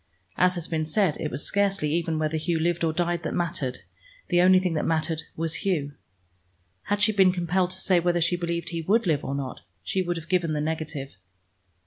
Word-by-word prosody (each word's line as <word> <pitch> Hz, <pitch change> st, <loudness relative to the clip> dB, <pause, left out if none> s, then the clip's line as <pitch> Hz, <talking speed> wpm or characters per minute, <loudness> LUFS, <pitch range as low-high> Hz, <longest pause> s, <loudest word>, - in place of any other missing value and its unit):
As 180 Hz, 0 st, +3 dB
has 170 Hz, -1 st, -4 dB
been 160 Hz, -1 st, -1 dB
said, 165 Hz, +1 st, +1 dB
it 150 Hz, -, -2 dB
was 150 Hz, -, +2 dB
scarcely 195 Hz, -6 st, +1 dB
even 165 Hz, -1 st, 0 dB
whether 155 Hz, 0 st, -1 dB
Hugh 165 Hz, +2 st, 0 dB
lived 170 Hz, +1 st, 0 dB
or 165 Hz, -, +2 dB
died 175 Hz, +1 st, -1 dB
that -, -, -3 dB
mattered: 150 Hz, -7 st, -2 dB, 0.5 s
the 175 Hz, -, +4 dB
only 185 Hz, +1 st, +6 dB
thing 180 Hz, -2 st, -1 dB
that 155 Hz, -, -1 dB
mattered 160 Hz, 0 st, 0 dB
was 165 Hz, 0 st, 0 dB
Hugh. 150 Hz, -7 st, -1 dB, 0.9 s
Had 205 Hz, 0 st, +1 dB
she 215 Hz, -, +5 dB
been 190 Hz, -3 st, +5 dB
compelled 180 Hz, 0 st, 0 dB
to 185 Hz, +1 st, -3 dB
say 185 Hz, -2 st, +3 dB
whether 175 Hz, 0 st, +1 dB
she 170 Hz, +2 st, +2 dB
believed 170 Hz, -1 st, -3 dB
he 165 Hz, -1 st, -3 dB
would 210 Hz, +7 st, +2 dB
live 155 Hz, -5 st, +1 dB
or 135 Hz, -, -3 dB
not, 135 Hz, -2 st, -5 dB, 0.2 s
she 190 Hz, -, -1 dB
would 175 Hz, -1 st, -2 dB
have 165 Hz, 0 st, -8 dB
given 170 Hz, -3 st, +1 dB
the 150 Hz, -, -1 dB
negative. 155 Hz, -3 st, -3 dB
170 Hz, 210 wpm, -26 LUFS, 155-180 Hz, 0.9 s, only